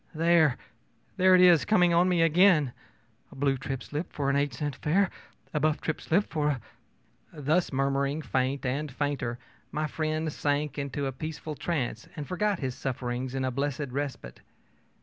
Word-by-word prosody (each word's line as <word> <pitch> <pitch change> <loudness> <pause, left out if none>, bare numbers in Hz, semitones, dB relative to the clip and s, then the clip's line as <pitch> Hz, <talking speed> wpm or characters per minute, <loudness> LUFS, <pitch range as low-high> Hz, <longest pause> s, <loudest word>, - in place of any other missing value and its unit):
There 160 -4 +4 0.6
there 185 0 +6
it 180 - +6
is 175 -3 +7
coming 180 -5 +4
on 175 +2 +4
me 175 -2 +3
again: 165 -5 +4 0.6
a - - -13
blue 135 0 +1
trip 135 0 -5
slip 150 +4 -5
for 140 -1 0
an - - 0
eight 140 0 +1
cent 145 +3 -4
fare, 190 +5 +2 0.4
a 150 - +1
buff 155 +1 +1
trip 160 - -3
slip 195 +6 +2
for 150 -2 +1
a 145 - +1
ö - - -9 0.8
Thus 155 +6 +1
murmuring 140 +2 0
faint 130 +1 -1
and 140 +3 -2
fainter, 140 -3 -2 0.3
my 155 +1 -1
friend 155 0 -2
sank 145 0 -1
into 140 0 -3
a 135 - -1
peaceful 155 +3 -6
trance 135 -8 -3
and 145 -2 -6
forgot 205 +2 0
his 130 -5 -3
sufferings 125 0 -3
in 130 -1 -1
a 130 - -1
blessed 140 +1 -2
respite. 135 - -5
145 Hz, 175 wpm, -28 LUFS, 135-160 Hz, 0.8 s, is